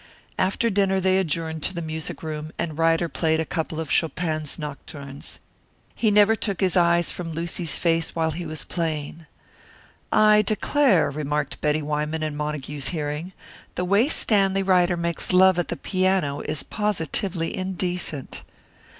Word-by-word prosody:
After 200 +5 +1
dinner 195 -1 +2
they 190 0 +3
adjourned 160 -2 -2
to 185 - -1
the - - -2
music 160 0 -4
room, 155 0 -5
and 160 -3 -3
Ryder 165 +1 +2
played 160 -1 0
a 160 - 0
couple 160 -1 -3
of 160 -3 -4
Chopin's 155 -2 0
Nocturnes. 140 -2 -8 0.6
He 225 - +1
never 210 +1 +5
took 200 -4 -3
his 190 -1 +1
eyes 170 -1 +3
from 165 -2 -5
Lucy's 165 -1 0
face 165 -1 0
while 160 -1 +1
he 170 +2 -5
was 155 -2 -4
playing. 160 -1 -4 0.8
"I 215 0 +6
declare," 210 - +2
remarked 150 0 -3
Betty 150 0 +1
Wyman 150 +1 -2
in 155 -1 -2
Montague's 150 -2 -3
hearing, 155 +2 -3 0.4
"the 180 - -1
way 200 +9 +3
Stanley 195 -7 +3
Ryder 180 -2 +3
makes 170 +1 -1
love 185 0 +6
at 175 - -1
the - - -4
piano 185 -7 0
is 155 0 -1
positively 190 -3 -2
indecent." 180 -6 -3
165 Hz, 150 wpm, -24 LUFS, 155-190 Hz, 0.8 s, I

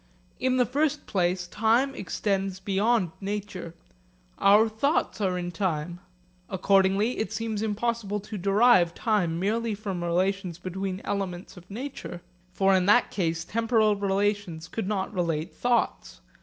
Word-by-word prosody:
In 255 0 +1
the 250 - +4
first 290 +4 0
place 180 -2 0
time 225 +8 +2
extends 195 -1 -2
beyond 200 0 +1
nature. 195 -4 -5 0.6
Our 205 +3 +6
thoughts 220 +2 0
are 185 -2 +1
in 175 0 -3
time. 170 -2 -2 0.5
Accordingly 195 +4 +2
it 220 -2 -2
seems 220 -1 -3
impossible 220 -1 -1
to 210 +2 -8
derive 195 -2 +4
time 180 -7 0
merely 220 +3 0
from 195 -4 -4
relations 180 +1 0
between 185 +2 -4
elements 190 -2 -4
of 180 0 -14
nature. 220 -6 -7 0.3
For 195 +1 +3
in 185 -1 +3
that 230 +4 +4
case 165 -4 -1
temporal 225 0 +2
relations 200 -4 -1
could 190 +3 -4
not 195 -2 -2
relate 170 -1 -1
thoughts. 235 - -1
195 Hz, 135 wpm, -27 LUFS, 180-220 Hz, 0.6 s, Our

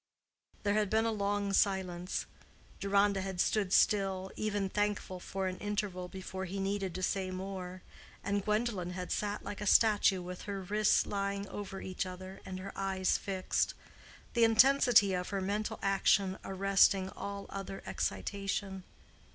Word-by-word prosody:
There 205 -1 +2
had 210 -1 +1
been 220 +2 +2
a 230 - +1
long 200 -1 -1
silence. 185 -2 0 0.5
Deronda 200 0 +2
had 190 -1 -4
stood 200 0 +1
still, 195 -2 +2
even 205 -2 -1
thankful 205 -2 -1
for 190 +1 -4
an 185 0 -3
interval 205 -3 -2
before 190 +1 -6
he 195 +2 -5
needed 195 -1 -2
to 185 - -4
say 190 +1 0
more, 185 -1 -6 0.4
and 200 0 0
Gwendolen 210 -4 -1
had 180 0 -5
sat 205 0 -2
like 205 - -6
a 210 - -2
statue 205 -3 +5
with 180 0 -7
her 200 -1 -2
wrists 210 +3 +3
lying 200 0 -2
over 195 -1 -6
each 185 0 -3
other 185 +1 -9
and 185 - -5
her 195 +1 -6
eyes 190 -1 0
fixed—the 195 +4 -2
intensity 230 -3 +6
of 180 0 -2
her 200 - -1
mental 205 +3 -2
action 195 -1 +2
arresting 195 0 +3
all 200 0 -6
other 195 0 -6
excitation. 195 -1 -3
195 Hz, 150 wpm, -32 LUFS, 190-205 Hz, 0.5 s, intensity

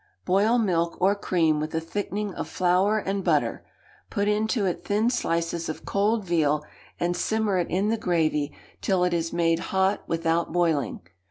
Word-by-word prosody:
Boil 205 +6 +3
milk 170 -7 0
or 190 +2 +4
cream 165 -6 +1
with 155 +1 -4
a - - +2
thickening 205 +4 -3
of - - -5
flour 185 +4 +2
and 195 -1 -2
butter; - - +1 0.5
put 200 -1 -1
into 215 +1 +1
it 180 - -2
thin 215 +4 +1
slices 170 -5 -1
of 155 - -6
cold 205 +1 +1
veal, 150 -4 +1 0.3
and 175 0 0
simmer 215 0 0
it 175 - -1
in 195 +4 +1
the 225 - +1
gravy 155 -7 0 0.3
till 185 -2 +1
it 180 -1 +1
is 165 -1 -1
made 165 -1 +2
hot 190 +2 0
without 165 0 0
boiling. 160 -7 0
180 Hz, 170 wpm, -25 LUFS, 165-205 Hz, 0.5 s, or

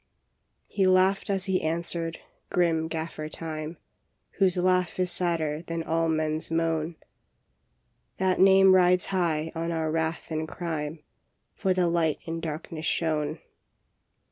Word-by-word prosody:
" - - -50 0.3
He 195 -2 +1
laughed 185 +2 +3
as 195 -1 0
he 190 -2 +1
answered, 165 0 -2 0.3
grim 165 -2 +1
Gaffer 160 -1 -5
Time, 155 0 -5 0.6
Whose 185 -2 +3
laugh 180 -1 +1
is 180 -1 +3
sadder 160 -4 0
than 165 -1 -4
all 165 0 0
men 155 -1 0
s 160 - -8
moan. 165 0 0 0.6
" - - -46
That 185 -1 +1
name 190 0 +7
rides 180 -1 +4
high 165 -4 0
on 165 +1 -3
our 160 -1 -1
wrath 160 +1 -2
and 155 0 -2
crime, 155 -2 -4 0.5
For 190 -3 0
the 180 -1 +2
Light 170 -3 +1
in 165 0 -4
darkness 160 0 -5
shone. 155 -1 -1
165 Hz, 145 wpm, -27 LUFS, 160-180 Hz, 0.6 s, name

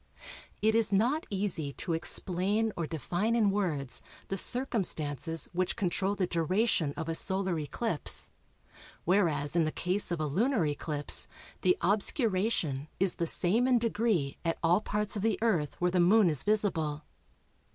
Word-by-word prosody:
It 220 +1 +4
is 225 -2 +3
not 240 +11 +1
easy 185 -8 -1
to 170 - -4
explain 195 +6 0
or 170 -2 -3
define 175 - -1
in 215 -4 +3
words 150 -11 -1 0.3
the 195 - -2
circumstances 165 - -1
which 180 +1 -1
control 195 +1 -1
the 195 - 0
duration 170 -2 0
of 160 -1 -4
a 165 - -1
Solar 190 0 0
eclipse, 160 +4 0 0.7
whereas 165 -6 +1
in 170 - +3
the 155 - -1
case 185 +6 -2
of 170 -2 -2
a 155 - -1
lunar 210 - +1
eclipse 145 0 +2 0.3
the 180 -1 +3
obscuration 190 - 0
is 190 -1 +1
the 170 - -1
same 215 +10 +2
in 255 -1 +4
degree 220 -10 0
at 165 -1 -1
all 175 +5 +3
parts 210 0 -1
of 205 - -3
the 220 -1 +1
Earth 175 -11 0
where 180 0 +1
the 180 - +1
Moon 185 +1 +5
is 145 -4 +1
visible. 165 -8 0
185 Hz, 155 wpm, -30 LUFS, 160-210 Hz, 0.7 s, Moon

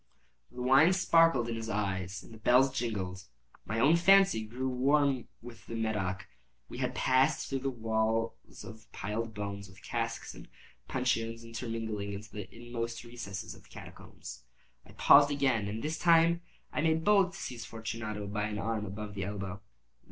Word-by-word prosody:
The 125 0 -6
wine 135 +8 +6
sparkled 165 -8 +4
in 120 - -2
his 115 0 -5
eyes 95 -2 -2
and - - -14
the 110 - -12
bells 130 +4 +4
jingled. 95 -7 -3 0.4
My 110 +3 -2
own 150 +8 +5
fancy 190 - +5
grew 125 +5 -4
warm 135 0 +2 0.2
with 115 -2 -12
the 115 - -5
Medoc. 100 -5 -2 0.4
We - - -8
had - - -1
passed 130 +1 +2
through 135 0 -1
walls 115 -1 -2
of 110 -2 -12
piled 110 +2 -4
bones, 100 -1 -5
with 95 +1 -17
casks - - -3
and - - -12 0.4
puncheons 115 -3 -1
intermingling, 115 -3 -4
into 105 +2 -8
the 105 -3 -7
inmost 120 0 -5
recesses 115 -3 -7
of - - -15
the - - -23
catacombs. - - -11 0.4
I - - -15
paused 145 0 +7
again, 135 -7 +1
and 110 +2 -4
this 155 +2 -2
time 170 0 +5 0.3
I - - 0
made 160 0 +2
bold 195 -2 +4
to - - -9
seize 120 -3 -6
Fortunato 110 -2 -5
by 105 +1 -2
an 105 -1 -4
arm 105 0 -2
above 105 +2 -6
the 100 -2 -3
elbow. 100 -1 -5
115 Hz, 165 wpm, -31 LUFS, 105-130 Hz, 0.4 s, paused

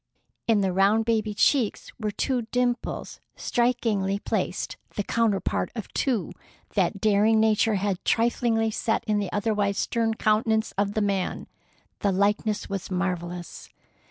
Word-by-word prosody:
In 220 -3 +4
the 190 -2 0
round 200 +4 +3
baby 220 -2 0
cheeks 245 -1 +2
were 215 -2 -1
two 240 +2 -1
dimples 245 -1 -1 0.2
strikingly 220 -5 0
placed, 195 -3 -2 0.2
the 205 - -1
counterpart 220 -3 0
of 220 - -7
two 245 -8 0 0.4
that 200 - +1
daring 215 +2 +4
Nature 220 0 +3
had 195 -1 -1
triflingly 225 -1 +1
set 225 +1 0
in 210 -2 0
the 200 -3 -3
otherwise 205 -1 0
stern 225 -1 0
countenance 220 0 +1
of 200 +1 0
the 215 - +1
man. 195 -2 -1 0.5
The 200 - +1
likeness 205 +2 +1
was 195 -2 -4
marvellous. 180 -2 -4
210 Hz, 135 wpm, -26 LUFS, 200-225 Hz, 0.5 s, In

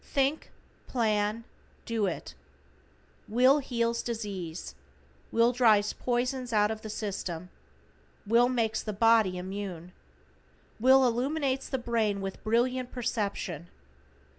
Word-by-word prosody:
THINK, 275 +2 0 0.4
PLAN, 215 -2 0 0.4
DO 225 -3 0
IT. 175 - -5 0.9
Will 255 +6 +5
heals 235 -3 -1
disease. 195 -8 -5 0.6
Will 230 +1 +4
drives 220 -4 +4
poisons 250 0 -1
out 210 -1 +3
of 220 0 -5
the 220 - -7
system. 185 -5 -4 0.7
Will 235 +4 +4
makes 225 -3 0
the 215 - -4
body 220 -3 +4
immune. 185 -2 -6 0.9
Will 260 +3 +6
illumines 265 +2 0
the 265 - -1
brain 225 -4 0
with 195 -1 -6
brilliant 245 +3 +1
perception. 200 - -3
230 Hz, 110 wpm, -29 LUFS, 205-245 Hz, 0.9 s, Will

